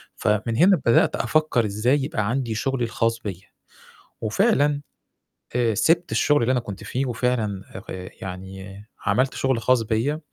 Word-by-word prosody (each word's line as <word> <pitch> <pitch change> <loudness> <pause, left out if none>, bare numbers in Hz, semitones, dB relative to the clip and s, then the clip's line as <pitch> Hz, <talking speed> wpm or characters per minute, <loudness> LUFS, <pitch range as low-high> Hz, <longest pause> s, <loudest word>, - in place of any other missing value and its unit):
فمن 105 +2 0
هنا 180 -3 +5
بدأت 115 - +4
أفكّر 125 -2 +1
إزاي 120 +7 +1
يبقى 105 -7 -1
عندي 120 -2 -1
شُغلي 135 +2 -1
الخاص 115 0 0
بيّا، 95 -3 -7 0.7
وفعلًا 145 - +2 0.8
آآ 120 -2 +2
سِبت 170 - +2
الشُغل 145 -3 +3
اللي 115 - +2
أنا 125 - +2
كنت 100 -4 -8
فيه 130 +2 -2
وفعلًا 115 -6 -1 0.3
آآ 90 0 -6
يعني 95 +2 -8 0.2
عملت 130 +1 +2
شُغل 130 -3 0
خاص 125 0 +3
بيّا 115 +7 -1
115 Hz, 145 wpm, -23 LUFS, 105-135 Hz, 0.8 s, هنا